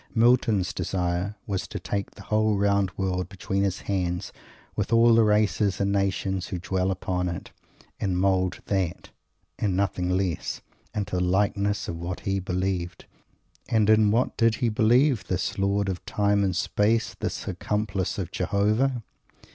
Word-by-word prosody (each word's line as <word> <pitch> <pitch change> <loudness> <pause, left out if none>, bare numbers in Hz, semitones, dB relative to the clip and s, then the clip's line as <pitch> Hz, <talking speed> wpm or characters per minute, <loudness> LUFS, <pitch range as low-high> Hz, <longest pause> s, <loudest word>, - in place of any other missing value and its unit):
Milton's 115 -4 +3
desire 90 +2 -2
was 95 -4 -3
to - - -6
take 100 -1 -4
the - - -11
whole 110 -1 +1
round 100 -1 +2
world 90 -1 -1
between 95 0 -2
his 100 0 -1
hands, 90 -1 -2 0.4
with - - -2
all 115 0 +6
the 115 0 +6
races 105 -1 +2
and 100 0 +1
nations 95 -1 0
who 95 - -4
dwell 95 +1 -1
upon 90 -1 -1
it, 85 - -6 0.5
and 95 -3 0
mould 95 -1 +1
that, 95 -4 -2 0.5
and 100 -3 0
nothing 95 -2 0
less, 90 -2 -1 0.3
into 100 -3 -2
the 90 - +1
likeness 100 +2 +1
of 85 - -4
what 85 +1 -5
he 95 0 -1
believed. 90 -2 -2 0.6
And 110 -1 +3
in 110 -1 +5
what 115 +4 +1
did 115 -1 +3
he 120 - 0
believe, 120 +3 +3
this 95 +1 -2
Lord 100 +1 +1
of 95 -2 -3
Time 100 0 +2
and 95 -2 0
Space, 105 +4 +1
this - - -4
accomplice 105 -3 -2
of 95 -3 -4
Jehovah? 110 +7 +1
100 Hz, 155 wpm, -26 LUFS, 95-105 Hz, 0.6 s, all